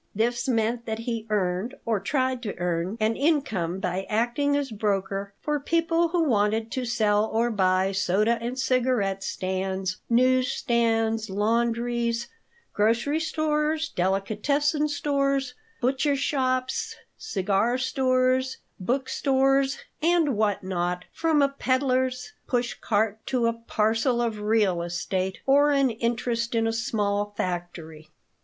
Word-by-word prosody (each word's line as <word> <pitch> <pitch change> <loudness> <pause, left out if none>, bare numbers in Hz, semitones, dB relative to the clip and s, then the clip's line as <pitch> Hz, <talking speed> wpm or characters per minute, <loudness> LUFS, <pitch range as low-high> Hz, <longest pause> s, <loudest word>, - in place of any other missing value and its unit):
This 240 +4 0
meant 235 -1 0
that 220 0 -2
he 230 -1 -4
earned, 195 +3 -1
or 225 -3 +1
tried 260 +4 -1
to 215 -5 -5
earn, 175 +3 -2
an 220 +1 +1
income 240 - 0
by 185 +1 -2
acting 240 +6 +1
as 280 -3 -2
broker 200 -2 -2
for 300 -1 -1
people 330 +3 +1
who 335 0 +1
wanted 220 -4 +1
to 255 -1 -2
sell 215 -3 +2
or 230 +2 0
buy 190 -2 +2
soda 205 +4 +1
and 240 +2 -4
cigarette 245 -7 +1
stands, 190 0 -2
news 255 +2 +3
stands, 225 -4 0
laundries, 235 +3 0 0.4
grocery 235 +8 +1
stores, 310 0 0
delicatessen 220 - 0
stores, 275 -3 0 0.3
butcher 270 +3 +1
shops, 260 -2 -1 0.2
cigar 200 +5 0
stores, 260 0 +1 0.2
book 255 +8 -1
stores, 270 0 +2 0.2
and 325 -5 +3
what 205 -2 0
not, 180 -1 -2
from 320 -3 +2
a - - +5
peddier's 255 -2 0
push 245 -1 0
cart 215 0 -1
to 250 -3 +1
a 230 - +2
"parcel" 230 +1 0
of 230 -3 -1
real 210 -5 +2
estate 180 +1 -3
or 285 +2 +5
an 275 -3 +3
interest 230 0 -1
in 225 0 +2
a 225 - 0
small 205 -2 -1
factory. 170 -3 -5
230 Hz, 130 wpm, -26 LUFS, 205-265 Hz, 0.4 s, a